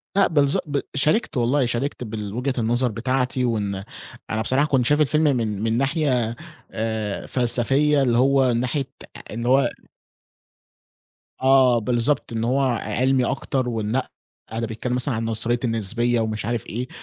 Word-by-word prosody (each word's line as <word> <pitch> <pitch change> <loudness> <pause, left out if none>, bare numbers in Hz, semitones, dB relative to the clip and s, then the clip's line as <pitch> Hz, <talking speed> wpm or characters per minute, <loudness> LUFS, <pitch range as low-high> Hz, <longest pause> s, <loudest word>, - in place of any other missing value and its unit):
لأ 200 -1 +5
بالضب 145 -3 +2
ب 145 -2 -1 0.2
شاركت 150 - +1
والله، 125 +3 +2
شاركت 125 +3 -2
بالوجهة 110 +4 -3
النظر 120 +2 +1
بتاعتي 125 +3 -1
وإن 100 -4 -2 0.5
أنا 110 0 -1
بصراحة 130 +6 +2
كنت 130 -5 +2
شايف 150 +3 +3
الفيلم 150 +2 +3
من 105 -3 -2
من 115 0 +1
ناحية 130 -5 0 0.4
آآ 110 -2 -3
فلسفية 135 +4 +2
اللي 120 -3 +2
هو 135 +1 +4
من 115 - 0
ناحية 135 +2 -1 0.3
آآ - - -11
إن 115 +1 -4
هو 135 +3 +4 1.7
آه 130 -2 +5
بالضبط، 120 +3 0
إن 115 - -2
هو 130 +4 +1
ع 125 -3 +1
عِلمي 130 +4 +1
أكتر 130 0 -1
ونأ، 115 +2 -2 0.4
ده 115 +1 -2
بيتكلم 120 +3 -3
مثلًا 125 0 0
عن 115 +1 -2
نظرية 115 +2 0
النسبية 115 +1 0
ومش 110 -2 -2
عارف 115 -1 -2
إيه 125 +4 -4
120 Hz, 155 wpm, -23 LUFS, 115-135 Hz, 1.7 s, لأ